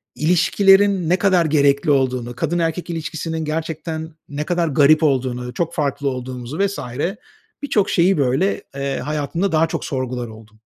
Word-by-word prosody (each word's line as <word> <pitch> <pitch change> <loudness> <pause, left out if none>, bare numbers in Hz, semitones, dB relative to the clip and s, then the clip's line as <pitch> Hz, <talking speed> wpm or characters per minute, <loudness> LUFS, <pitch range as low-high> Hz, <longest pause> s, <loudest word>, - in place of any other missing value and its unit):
ilişkilerin 190 +2 +3
ne 180 - +4
kadar 185 -4 +3
gerekli 140 -1 +3
olduğunu, 125 -3 0
kadın 175 +7 -1
erkek 165 +2 -2
ilişkisinin 160 -1 -4
gerçekten 160 +1 -4 0.2
ne 145 +1 -3
kadar 175 -1 0
garip 150 +3 +4
olduğunu, 125 -4 0
çok 170 +3 -2
farklı 140 -2 -1
olduğumuzu 125 +2 -6
vs. 200 0 0 0.8
birçok 210 -8 +1
şeyi, 180 0 +3
böyle, 140 +8 +1
eee, 140 -1 -2
hayatımda 155 +6 -2
daha 160 +1 +3
çok - - -4
sorgular 130 -4 -3
oldum. 110 -1 -14
155 Hz, 145 wpm, -20 LUFS, 135-170 Hz, 0.8 s, ne